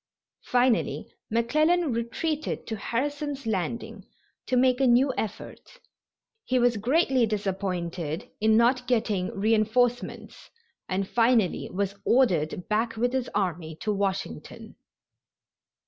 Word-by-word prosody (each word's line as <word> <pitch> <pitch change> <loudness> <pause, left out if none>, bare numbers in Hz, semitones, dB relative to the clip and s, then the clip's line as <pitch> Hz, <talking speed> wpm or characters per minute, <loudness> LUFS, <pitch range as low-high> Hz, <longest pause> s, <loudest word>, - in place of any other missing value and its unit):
Finally 245 -2 +1 0.2
McClellan 305 +7 +2
retreated 295 +7 -3
to 225 - -4
Harrison's 285 +5 -3
Landing 225 +1 -3 0.4
to 255 - +1
make 255 +1 +3
a 265 - +4
new 255 +3 +4
effort. 220 - -6 0.7
He 255 - 0
was 240 -2 +3
greatly 260 +1 +2
disappointed 180 -6 -3
in 220 0 +4
not 250 +2 +3
getting 215 -6 +1
reinforcements, 225 +4 0 0.4
and 190 +1 -1
finally 230 -4 +2
was 200 +1 -1
ordered 180 - +2
back 225 +2 0
with 245 +2 0
his 260 -2 -1
army 175 -5 -2
to 215 - 0
Washington. 190 - -4
230 Hz, 110 wpm, -26 LUFS, 200-255 Hz, 0.7 s, a